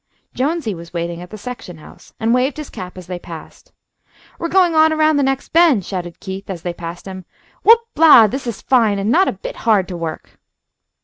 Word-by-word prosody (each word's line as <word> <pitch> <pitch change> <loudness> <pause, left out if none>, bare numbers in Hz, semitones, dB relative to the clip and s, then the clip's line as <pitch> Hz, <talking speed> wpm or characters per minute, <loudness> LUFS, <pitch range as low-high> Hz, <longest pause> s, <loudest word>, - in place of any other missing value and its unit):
Jonesy 280 -3 -1
was 170 -1 -11
waiting 170 0 -3
at 180 - -10
the 215 - -9
section 210 -6 -8
house, 155 - -16
and 230 0 +1
waved 255 +3 +1
his 305 -2 -7
cap 180 0 -8
as 185 - -9
they 180 0 -6
passed. 165 -2 -12 0.7
"We're 335 - -2
going 360 -2 +3
on, 315 0 +5
around 310 -1 +2
the - - +2
next 270 0 -1
bend," 315 - +4
shouted 175 -3 -6
Keith, 195 0 -7
as 175 -4 -6
they 175 - -3
passed 170 0 -8
him. 190 -1 -8 0.4
"Whoop 455 +2 +6
la! 305 -7 +8
this 255 +5 -4
is 230 - -5
fine, 225 -6 +3
and 200 +3 -1
not 375 +7 +4
a - - +1
bit - - -8
hard 205 -5 +2
to 180 - -5
work!" 165 -2 -7
215 Hz, 210 wpm, -18 LUFS, 180-300 Hz, 0.7 s, la